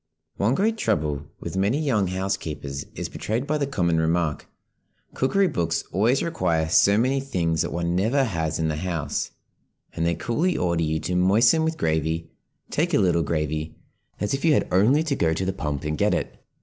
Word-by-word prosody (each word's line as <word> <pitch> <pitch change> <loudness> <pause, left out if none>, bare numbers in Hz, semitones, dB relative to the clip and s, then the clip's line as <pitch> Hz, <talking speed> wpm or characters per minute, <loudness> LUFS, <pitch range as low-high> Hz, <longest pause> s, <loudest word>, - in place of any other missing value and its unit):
ONE 110 +6 +2
great 220 +5 +1
trouble 75 - -1
with - - -6
many 100 +8 +1
young 120 -11 +1
housekeepers 80 -7 -3
is - - -3
betrayed 115 +5 -3
by 155 +1 -1
the 140 - 0
common 85 -11 +1
remark, 80 -1 0 0.7
"Cookery 195 +10 +2
books 85 - -1
always 115 +8 +2
require 85 - 0
so 100 +5 +5
many 130 +4 +2
things 85 - -1
that - - -2
one 85 0 -1
never 115 +9 +2
has 80 - -1
in 80 - 0
the 75 -1 -2
house, 80 -4 -2 0.6
and 80 - -2
they 85 0 +1
coolly 155 - 0
order 85 -2 0
you 80 0 0
to 90 - -3
'moisten 110 - +4
with 160 0 -1
gravy,' 80 +1 -1 0.4
'take 165 +1 +1
a - - +5
little 90 -4 +3
gravy,' 75 0 -2 0.4
as 105 - -1
if 135 - -2
you 160 -2 +5
had - - +2
only 120 +12 +4
to 155 -4 -1
go 80 -9 +1
to 95 - -2
the 95 - -1
pump 75 -6 -3
and 75 0 -3
get - - +3
it." - - -3
90 Hz, 190 wpm, -24 LUFS, 80-130 Hz, 0.7 s, so